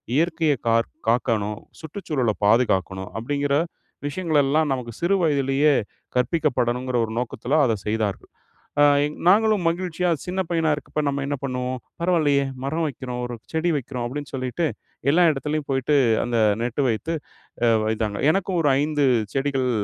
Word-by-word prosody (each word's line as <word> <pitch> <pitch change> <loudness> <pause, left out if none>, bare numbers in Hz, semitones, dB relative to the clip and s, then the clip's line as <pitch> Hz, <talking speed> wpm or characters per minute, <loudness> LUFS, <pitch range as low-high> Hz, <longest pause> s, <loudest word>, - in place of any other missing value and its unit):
இயற்கைய 160 -2 +2
கார் 115 0 +2 0.2
காக்கணும், 110 -2 0 0.2
சுற்றுச்சூழல 150 - -2
பாதுகாக்கணும் 95 -4 +2
அப்டிங்கிற 140 +3 0 0.5
விஷயங்கள் 155 -1 +1
எல்லாம் 150 +2 +2
நமக்கு 120 -2 -4
சிறு 190 +3 +3
வயதிலயே 140 0 +3 0.4
கற்பிக்கப்படணுங்கிற 125 -3 0
ஒரு 110 - -7
நோக்கத்தில 130 +4 -1
அத 115 - +2
செய்தார்கள். 105 -2 -2 0.5
ஆ, - - +7 0.2
எங் 150 - -3
நாங்களும் 210 -2 +4
மகிழ்ச்சியா 180 0 -1 0.2
சின்ன 185 +1 -2
பையனா 165 -2 +1
இருக்கப்ப 150 +1 -4
நம்ம 140 0 -1
என்ன 145 0 -1
பண்ணுவோம்? 125 -1 -2 0.2
"பரவால்லையே, 155 -6 +2 0.2
மரம் 160 +4 -1
வைக்கிறோம்! 125 -3 -5
ஒரு 120 0 -5 0.2
செடி 160 +2 +1
வைக்கிறோம்!"அப்டின்னு 135 +2 -5
சொல்லிட்டு 130 +5 -1 0.4
எல்லா 175 +4 +4
இடத்துலயும் 150 +1 -2
போய்ட்டு 135 +2 +2 0.3
அந்த 120 -1 0 0.2
நெட்டு 125 +4 -1
வைத்து 115 +9 -1 0.5
அ - - +5 0.2
வைத்தாங்க. 110 -2 -1
எனக்கும் 190 0 0
ஒரு 150 - +3
5 150 -1 +1 0.3
செடிகள் 135 -2 0
140 Hz, 135 wpm, -23 LUFS, 120-160 Hz, 0.5 s, ஆ